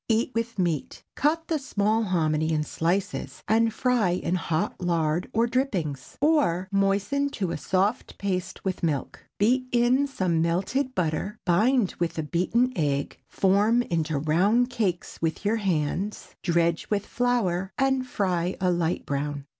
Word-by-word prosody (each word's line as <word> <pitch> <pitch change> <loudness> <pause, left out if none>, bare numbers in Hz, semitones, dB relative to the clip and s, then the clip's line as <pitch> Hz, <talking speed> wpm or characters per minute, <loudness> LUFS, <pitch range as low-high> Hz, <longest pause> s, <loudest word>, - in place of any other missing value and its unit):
Eat 225 +3 +2
with 230 0 -2
meat. 170 -6 -2
Cut 320 +3 +1
the 320 -2 0
small 215 -4 +1
hominy 160 -4 +1
in 155 -1 +1
slices 170 +5 -2
and 225 +2 +3
fry 240 -3 +1
in 175 0 -1
hot 180 +2 -1
lard 170 -1 0
or 230 +1 +2
drippings. 195 - -2
Or, 280 - +2
moisten 200 +9 +1
to 190 -6 -1
a - - -2
soft 195 +5 -1
paste 185 -2 -3
with 190 -1 -2
milk; 150 -5 -2
beat 255 +5 +2
in 245 +3 +3
some 185 -11 0
melted 195 +11 0
butter, 180 +5 -1
bind 210 +5 +3
with 170 -1 -1
a 160 - -1
beaten 210 +11 +1
egg, 140 -4 -1
form 205 +5 +3
into 160 -6 -1
round 195 - +2
cakes 195 -7 -2
with 165 +4 -2
your 220 +3 +2
hands, 190 +1 -2
dredge 170 -1 +1
with 205 -1 0
flour 195 -7 0
and 265 -1 +1
fry 185 -6 -1
a 185 -1 +2
light 170 -1 -1
brown. 145 0 -3
190 Hz, 150 wpm, -26 LUFS, 170-235 Hz, -, and